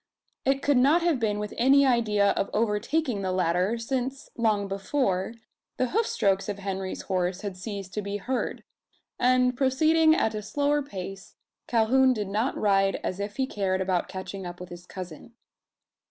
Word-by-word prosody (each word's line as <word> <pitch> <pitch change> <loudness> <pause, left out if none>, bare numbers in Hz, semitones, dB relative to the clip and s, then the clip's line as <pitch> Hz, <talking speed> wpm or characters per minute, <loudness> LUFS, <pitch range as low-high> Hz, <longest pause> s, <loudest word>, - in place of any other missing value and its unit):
It 270 +1 +1
could 285 -2 +3
not 290 +7 +4
have 335 -6 +2
been 210 -3 0
with 210 0 -4
any 275 +3 +5
idea 215 -5 +3
of - - -1
overtaking 230 +3 0
the 190 -1 -1
latter: 185 +4 +1
since, 260 +3 -3
long 215 -4 +1
before, 195 0 -1 0.4
the 255 - 0
hoofstrokes 200 - +1
of 200 - -3
Henry's 195 -1 -4
horse 185 0 -1
had 200 -3 -5
ceased 195 -1 -7
to 210 - -2
be 200 0 -3
heard; 255 +5 -3 0.6
and 250 0 +3
proceeding 315 +5 +4
at 220 - +1
a 215 - -3
slower 290 +6 0
pace, 195 -7 -8 0.3
Calhoun 255 +3 +4
did 210 -4 -3
not 220 +6 -1
ride 195 -1 +2
as 185 - -3
if 205 +1 -4
he 265 - +1
cared 195 -6 -1
about 185 -2 0
catching 190 +1 -6
up 175 0 -7
with 180 0 -8
his 175 0 -11
cousin. 185 +3 -9
210 Hz, 170 wpm, -27 LUFS, 195-260 Hz, 0.6 s, any